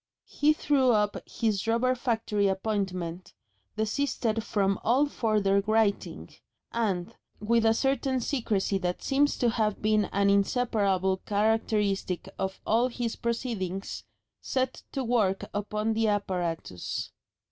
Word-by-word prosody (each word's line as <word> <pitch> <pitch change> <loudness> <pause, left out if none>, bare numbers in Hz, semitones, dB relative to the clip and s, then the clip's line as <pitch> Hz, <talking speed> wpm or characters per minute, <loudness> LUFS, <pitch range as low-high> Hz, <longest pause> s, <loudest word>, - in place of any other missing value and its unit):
He 295 +1 +2
threw 275 -4 +2
up 210 -1 +1
his 215 -2 -1
rubber 235 +3 +2
factory 225 -5 0
appointment, 190 -3 -3 0.4
desisted 225 0 -1
from 195 -3 0
all 255 +6 +4
further 210 -7 +1
writing, 215 -2 0 0.4
and, 195 -6 -1 0.2
with 225 +2 +2
a 225 - +4
certain 270 0 +1
secrecy 220 -7 0
that 180 -1 -3
seems 285 +1 +2
to 240 -3 +2
have 215 -3 0
been 215 -1 +2
an 200 0 +2
inseparable 200 -3 +1
characteristic 205 -3 0
of 190 0 -3
all 230 +3 +3
his 240 -2 -3
proceedings, 220 -6 -3 0.4
set 260 -1 -2
to 270 - -2
work 220 -6 +1
upon 210 +2 -1
the 225 0 +1
apparatus. 180 - -2
215 Hz, 120 wpm, -28 LUFS, 195-235 Hz, 0.4 s, all